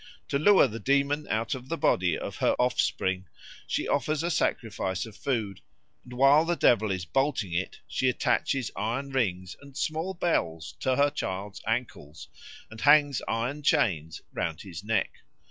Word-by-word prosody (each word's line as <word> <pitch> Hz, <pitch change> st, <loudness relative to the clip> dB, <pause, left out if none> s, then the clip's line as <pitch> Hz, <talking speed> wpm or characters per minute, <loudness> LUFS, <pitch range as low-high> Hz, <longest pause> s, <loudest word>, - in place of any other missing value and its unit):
To 140 Hz, -, +1 dB
lure 190 Hz, -1 st, +6 dB
the 115 Hz, -1 st, -7 dB
demon 140 Hz, +3 st, +1 dB
out 110 Hz, +1 st, 0 dB
of 130 Hz, 0 st, -7 dB
the 165 Hz, -, -2 dB
body 90 Hz, -, +2 dB
of -, -, -6 dB
her -, -, +2 dB
offspring, 95 Hz, -6 st, 0 dB, 0.4 s
she -, -, -1 dB
offers 155 Hz, +1 st, 0 dB
a 170 Hz, -, 0 dB
sacrifice 105 Hz, -, -1 dB
of 110 Hz, -2 st, -12 dB
food; 110 Hz, -9 st, -2 dB, 0.4 s
and 125 Hz, -, -12 dB
while 135 Hz, +4 st, +5 dB
the 170 Hz, +1 st, 0 dB
devil 110 Hz, -8 st, +3 dB
is 95 Hz, -2 st, -2 dB
bolting 135 Hz, -, 0 dB
it, 90 Hz, +2 st, -3 dB
she 130 Hz, -, +1 dB
attaches 125 Hz, 0 st, 0 dB
iron 120 Hz, +6 st, -2 dB
rings 95 Hz, -8 st, -1 dB
and 140 Hz, -1 st, -13 dB
small 160 Hz, +6 st, -2 dB
bells 80 Hz, -, -1 dB
to 130 Hz, -1 st, +1 dB
her 145 Hz, +1 st, +3 dB
child's 95 Hz, -6 st, -5 dB
ankles 80 Hz, -, -4 dB, 0.4 s
and 110 Hz, -, -10 dB
hangs 145 Hz, -2 st, +5 dB
iron 125 Hz, +6 st, -2 dB
chains 80 Hz, -, +1 dB
round 80 Hz, -1 st, -3 dB
his 95 Hz, -2 st, -8 dB
neck. 110 Hz, -2 st, -1 dB
120 Hz, 165 wpm, -28 LUFS, 95-140 Hz, 0.4 s, lure